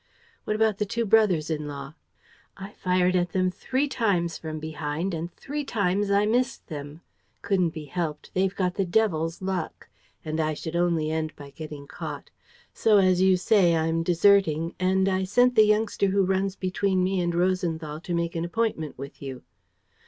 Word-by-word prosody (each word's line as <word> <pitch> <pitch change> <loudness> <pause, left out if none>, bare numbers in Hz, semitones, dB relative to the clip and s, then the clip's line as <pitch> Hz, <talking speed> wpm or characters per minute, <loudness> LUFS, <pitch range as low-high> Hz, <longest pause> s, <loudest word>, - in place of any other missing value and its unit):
"What 215 - -1
about 215 -2 +1
the 210 - +1
two 230 +3 -1
brothers 195 -7 +3
in 150 -1 -2
law?" 140 0 -7 0.6
"I 195 +1 -8
fired 180 -1 +1
at 175 -1 0
them 185 -1 +1
three 260 +9 -1
times 190 - 0
from 155 -1 -6
behind 155 +3 -3
and 165 +2 -4
three 295 +8 -5
times 200 -5 0
I 200 +1 +3
missed 245 +4 0
them. 145 0 -8 0.4
Couldn't 185 -4 +2
be 155 -1 -8
helped: 155 0 -4
they've 190 +1 +1
got 180 -2 0
the 195 - 0
devil's 175 -3 0
luck; 185 -4 -4 0.4
and 155 +1 -3
I 155 -1 0
should 160 +2 -6
only 170 -3 +1
end 160 -1 -2
by 140 -1 -11
getting 150 -2 -8
caught. - - -7 0.4
So, 215 -2 +4
as 185 -2 +4
you 190 -1 +5
say, 180 -3 +3
I'm 165 +1 +1
deserting; 170 -2 +3
and 190 +1 +2
I 190 0 +1
sent 245 +6 +3
the 215 -3 +6
youngster 210 -1 +2
who 195 0 +2
runs 190 +1 0
between 185 0 0
me 185 0 +1
and 175 -1 -1
Rosenthal 170 -4 -1
to 175 - -4
make 170 0 -2
an 165 - -1
appointment 175 -5 -2
with 140 +2 -9
you." 135 -2 -7
180 Hz, 180 wpm, -26 LUFS, 160-200 Hz, 0.6 s, the